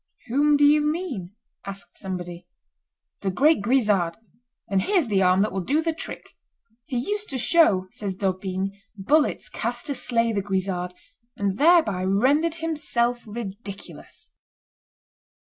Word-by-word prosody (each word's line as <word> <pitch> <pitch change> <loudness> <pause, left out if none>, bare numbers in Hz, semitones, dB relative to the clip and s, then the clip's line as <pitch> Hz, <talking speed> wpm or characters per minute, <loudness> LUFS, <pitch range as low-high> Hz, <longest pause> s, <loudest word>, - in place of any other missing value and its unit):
"Whom 290 +4 +3
do 290 - +5
you 300 +1 +5
mean?" 295 - -3 0.3
asked 195 -3 -8
somebody. 175 -2 -6 0.7
"The 195 - -2
great 290 - +3
Guisard; 205 -7 +2 0.5
and 195 -3 +1
here's 375 - +2
the 195 -2 +2
arm 185 +1 +4
that 215 - -1
will 190 +1 -2
do 280 - +1
the 330 0 0
trick." 315 - -8 0.6
"He 260 -5 -2
used 415 - -2
to 270 - -2
show," 235 - +3
says 200 -3 -5
D'Aubigne, 190 0 -2 0.2
"bullets 290 +10 +1
cast 240 +3 -4
to 290 - -1
slay 230 -3 +1
the 200 - 0
Guisard, 190 -2 -2 0.4
and 200 0 -1
thereby 300 - +4
rendered 275 - +2
himself 290 -7 -1
ridiculous." 205 -2 -9
215 Hz, 135 wpm, -24 LUFS, 190-290 Hz, 0.7 s, do